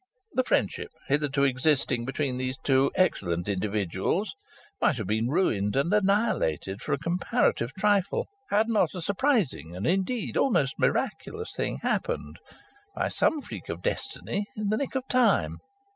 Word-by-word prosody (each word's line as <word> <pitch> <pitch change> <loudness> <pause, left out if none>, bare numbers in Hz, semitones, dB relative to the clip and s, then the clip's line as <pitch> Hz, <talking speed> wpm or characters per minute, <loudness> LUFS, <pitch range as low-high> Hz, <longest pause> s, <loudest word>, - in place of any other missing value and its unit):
The 255 - +3
friendship - - 0 0.2
hitherto 145 -1 +2
existing 130 -2 +2
between 135 0 -2
these 130 0 -2
two 135 0 +4
excellent 90 - +1
individuals 100 - -1 0.5
might 140 - +3
have 110 - -3
been 110 +4 0
ruined 120 - +1
and 140 +8 +2
annihilated 195 - +1
for - - -2
a - - +2
comparative 170 - 0
trifle, 205 - +1 0.2
had 215 +2 +3
not 220 -3 +2
a 180 - -4
surprising 190 - 0
and 95 - -4
indeed 195 +6 0
almost 140 - +2
miraculous 445 +1 -1
thing - - -2
happened, - - -1 0.6
by - - 0
some - - +2
kind 300 -3 -5
of - - -12
freak - - -8
of - - -5
destiny, 205 0 -2
in 210 -1 -1
the 215 - +2
nick 275 +1 -3
of 265 0 -2
time. 255 -1 +2
150 Hz, 155 wpm, -27 LUFS, -, 0.6 s, two